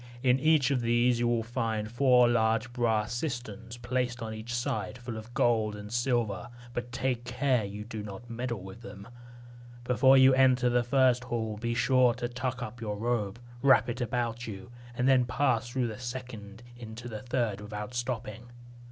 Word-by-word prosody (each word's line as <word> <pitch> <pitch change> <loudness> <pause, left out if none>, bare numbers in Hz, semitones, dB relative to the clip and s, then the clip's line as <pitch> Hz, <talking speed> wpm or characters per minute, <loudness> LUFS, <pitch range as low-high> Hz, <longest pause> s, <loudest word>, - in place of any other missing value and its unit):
In 130 0 +4
each 155 -2 +3
of 130 -3 +1
these 120 +1 +2
you 120 - +2
will 120 -1 +1
see 115 -2 -2
four 125 +2 +4
large 115 0 +1
brass 115 -3 0
cisterns 120 -4 -5
placed 125 0 -2
on 110 -1 -5
each 110 +2 -7
side, 110 -2 -2
full 120 -1 -7
of 110 +2 -9
gold 110 -3 +2
and 105 0 -9
silver; 120 -3 0 0.2
but 120 0 -4
take 130 -1 -1
care 125 -1 +1
you 105 +1 -6
do 110 -1 -6
not 105 +3 -8
meddle 120 -3 -4
with 95 +5 -10
them. 100 -2 -10 0.8
Before 130 +2 +5
you 130 0 +7
enter 130 -2 +4
the 120 0 +3
first 125 0 +3
hall, 110 -3 -2
be 120 +2 -2
sure 125 -1 +4
to 120 - -3
tuck 125 +1 -3
up 115 +1 -8
your 105 -2 -3
robe, 110 -2 -1 0.2
wrap 135 -2 +5
it 120 +2 -4
about 120 0 -2
you, 105 +2 -8 0.2
and 125 +2 +1
then 130 -2 +5
pass 120 -3 0
through 125 0 -1
the 110 -1 -5
second 120 -4 -7
into 120 0 -9
the 110 -3 -6
third 120 -5 -1
without 105 +2 -6
stopping. 120 -1 -4
120 Hz, 180 wpm, -29 LUFS, 110-125 Hz, 0.8 s, you